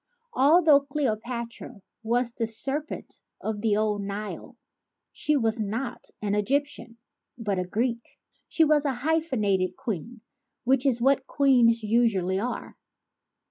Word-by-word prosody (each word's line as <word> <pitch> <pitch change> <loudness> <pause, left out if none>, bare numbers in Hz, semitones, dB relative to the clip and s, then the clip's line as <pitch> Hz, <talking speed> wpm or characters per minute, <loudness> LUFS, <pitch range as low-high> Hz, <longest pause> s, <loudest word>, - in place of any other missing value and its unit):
Altho 305 +1 +6
Cleopatra 240 -5 -4 0.2
was 235 +2 0
the 230 -1 -2
Serpent 275 +7 -4 0.2
of 220 -1 -4
the 210 -2 +2
Old 210 -1 0
Nile 200 +1 -6 0.6
she 300 -1 +1
was 225 -2 0
not 230 +5 -4
an 205 -1 0
Egyptian 240 +1 -1 0.4
but 205 -5 -2
a 180 - -1
Greek; 235 +4 -3 0.3
she 325 - +3
was 300 -1 +3
a 280 -2 0
hyphenated 240 - 0
queen, 225 +3 -5 0.4
which 265 +1 +2
is 240 -3 +1
what 270 0 +3
queens 240 -5 +3
usually 210 -5 +2
are. 245 +4 -5
235 Hz, 125 wpm, -26 LUFS, 215-270 Hz, 0.6 s, Altho